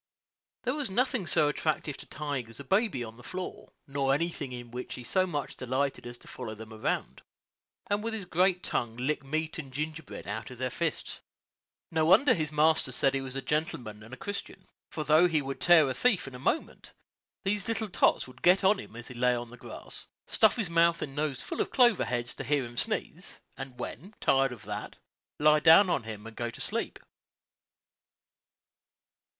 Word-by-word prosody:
There 250 - 0
was 295 -5 -2
nothing 240 -1 +1
so 150 - +4
attractive 150 -1 -1
to - - -11
Tige 140 -5 -4
as 115 - -8
a - - -6
baby 195 - +1
on 110 0 -9
the 120 - -13
floor, 185 +6 -6
nor 135 -1 +1
anything 155 -4 -2
in 120 -1 -7
which 125 +1 -5
he 125 - -8
so 185 +10 +1
much 145 -5 -3
delighted 130 +1 -2
as 120 0 -7
to - - -14
follow 115 -4 -6
them 110 +1 -10
around, 110 - -2 0.7
and 205 +1 0
with 225 0 -2
his 205 -4 -4
great 180 +1 +2
tongue 115 -1 -2
lick 140 +4 -1
meat 155 +4 -2
and 140 -4 -7
gingerbread 155 +2 -5
out 110 +5 -4
of 125 - -10
their 130 0 -2
fists. 165 +3 -3 0.7
No 160 -1 +2
wonder 205 - +6
his 155 -2 -1
master 155 -2 +3
said 135 +2 +2
he 135 - 0
was 130 -1 -6
a 135 - -3
gentleman 125 -7 -2
and 110 +3 -12
a 130 - -7
Christian; 205 0 -6 0.2
for 155 - -4
though 155 +4 +6
he 160 -3 +2
would 135 -2 -5
tear 165 -1 +7
a 130 - -1
thief 215 - +2
in 135 - -8
a 125 - -7
moment, 220 - -2 0.5
these 200 0 -1
little 225 -1 0
tots 190 - +3
would 125 0 -15
get 180 +2 +5
on 195 +1 +5
him 155 - -9
as 120 0 -7
he - - -8
lay 125 0 +2
in 120 -1 -8
the - - -9
grass, - - -8 0.2
stuff 220 - +4
his 220 -6 -1
mouth 170 0 +4
and 135 -2 -6
nose 145 -3 -1
full - - -3
of - - -1
clover 240 -6 +4
heads 120 -1 -2
to - - -6
hear 145 -3 +1
him 120 0 -9
sneeze, - - -2 0.2
and, 135 -1 -7
when 175 - -7
tired 135 -1 +3
of 120 -4 -9
that, - - -6 0.4
lie 150 +1 +5
down 165 +5 +7
on 140 - +2
him 110 -1 -7
and 115 0 -9
go 120 0 -2
to 115 - -11
sleep. - - -2
145 Hz, 205 wpm, -29 LUFS, 125-175 Hz, 0.7 s, tear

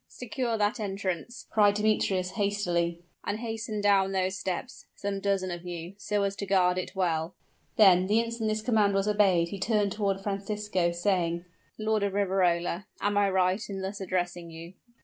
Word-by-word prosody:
"Secure 245 -1 -3
that 210 +3 +1
entrance!" 195 +2 -4
cried 205 -2 +4
Demetrius, 205 -3 +1
hastily; 175 -5 -1 0.2
"and 205 - -2
hasten 225 -2 -4
down 195 -1 +3
those 190 0 0
steps, 190 +7 -5
some 200 -1 -3
dozen 195 -2 0
of 175 0 -6
you, 175 0 -6
so 205 0 0
as 200 0 -1
to 200 - -4
guard 185 -1 +3
it 185 - -6
well!" 170 -2 0 0.4
then, 185 -3 +6
the 215 +3 +3
instant 230 -1 -1
this 215 0 -1
command 215 -4 +3
was 195 +1 +1
obeyed 195 -5 +3
he 200 - -6
turned 205 0 +1
toward 200 -1 0
Francisco, 200 -2 -1
saying, 175 -1 0 0.3
"Lord 215 0 0
of 200 -1 0
Riverola 185 -2 +1
am 205 +1 0
I 205 -1 +3
right 185 +1 +2
in 195 -1 -4
thus 195 +1 -5
addressing 175 -2 -2
you?" 165 +2 -10
195 Hz, 170 wpm, -28 LUFS, 180-210 Hz, 0.4 s, then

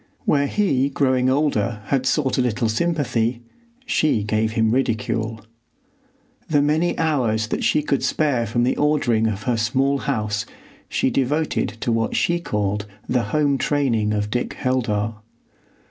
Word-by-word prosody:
Where 140 -1 +2
he 140 -8 +1
growing 130 -2 +1
older 120 -6 0
had 130 +3 0
sought 135 -2 +1
a - - +4
little 120 -1 0
sympathy, 120 -3 0 0.4
she 150 - +1
gave 110 +1 0
him 110 -1 +2
ridicule. 115 -3 -1 1.1
The 150 -2 +3
many 155 +4 +1
hours 125 -9 +1
that - - -2
she 150 - +2
could 140 -3 0
spare 130 -3 +1
from 120 +3 0
the 125 - +1
ordering 130 -7 +2
of 105 -1 -3
her 125 -3 0
small 135 +5 +1
house 105 -1 -2 0.4
she 130 - +1
devoted 140 -2 0
to 120 - 0
what 115 -1 0
she 175 0 +1
called 105 -7 -2 0.2
the 125 -4 +1
home 140 +3 +1
training 120 -8 +1
of 105 0 -1
Dick 125 +1 -1
Heldar. 115 -4 -1
125 Hz, 145 wpm, -22 LUFS, 110-140 Hz, 1.1 s, a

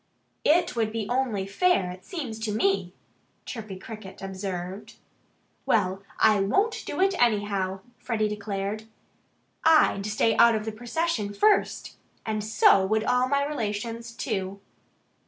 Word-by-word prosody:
"It 340 +1 +3
would 220 -2 0
be 225 -1 -3
only 245 -6 0
fair, 200 - +2
it 185 +1 -11
seems 260 -11 -5
to 220 -1 -2
me," 195 -4 +1 0.5
Chirpy 215 -6 -7
Cricket 200 -1 -10
observed. 190 0 -5 0.7
"Well, 195 -3 +1 0.2
I 215 -2 +5
won't 395 - +1
do - - -4
it, 385 +1 +3
anyhow," 200 -4 +1 0.2
Freddie 220 -3 0
declared. 210 0 -4 0.8
"I'd 305 -11 +4
stay 215 +1 +2
out 235 -1 +6
of 215 0 -3
the 220 - -2
procession 235 -1 -2
first. 420 - +1 0.3
And 215 -1 -2
so 210 -2 +5
would 215 +3 +1
all 250 +1 +2
my 280 0 +2
relations, 230 -3 -4
too." 200 -5 -3
215 Hz, 135 wpm, -26 LUFS, 195-240 Hz, 0.8 s, out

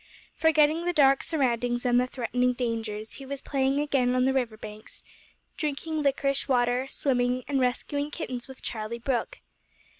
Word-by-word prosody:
Forgetting 320 +1 +3
the 355 - +1
dark 275 -3 +5
surroundings 245 -5 0
and 245 0 +4
the 250 - -1
threatening 250 0 0
dangers, 225 -3 -3
he 275 - -10
was 280 0 -4
playing 270 0 0
again 265 -4 +1
on 255 0 +3
the 265 - +2
river 240 -5 -1
banks, 215 0 -9 0.5
drinking 305 +1 -2
liquorice 275 -1 +1
water, 250 0 +2
swimming, 250 -2 0
and 280 -2 +1
rescuing 285 +3 0
kittens 255 -6 -5
with 265 -1 -12
Charlie 220 0 -4
Brooke. 240 0 -2
255 Hz, 155 wpm, -27 LUFS, 245-280 Hz, 0.5 s, dark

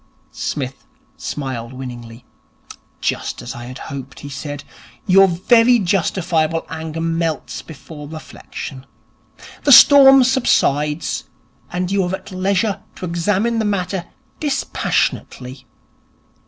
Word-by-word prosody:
Psmith 135 -2 -5 0.3
smiled 130 -4 -5
winningly. 120 -2 -9 0.8
'Just - - -2
as 120 - -6
I 120 0 -8
had 130 +2 -8 0.2
hoped,' 135 -1 -8
he 145 - -8
said. 145 +1 -6 0.4
'Your 195 +1 +6
very 230 +7 +4
justifiable 170 -4 0
anger 160 0 -5
melts 165 -4 -2
before 150 -1 -11
reflection. 140 -3 -9 0.8
The 285 - +3
storm 270 0 +9
subsides, 150 - +1 0.5
and 180 +1 -2
you 195 -1 +2
are 180 +2 -1
at 190 +1 -12
leisure 195 +2 0
to - - -6
examine 200 +7 0
the - - +1
matter 190 -3 -2 0.3
dispassionately. 130 - -2
165 Hz, 110 wpm, -19 LUFS, 140-195 Hz, 0.8 s, storm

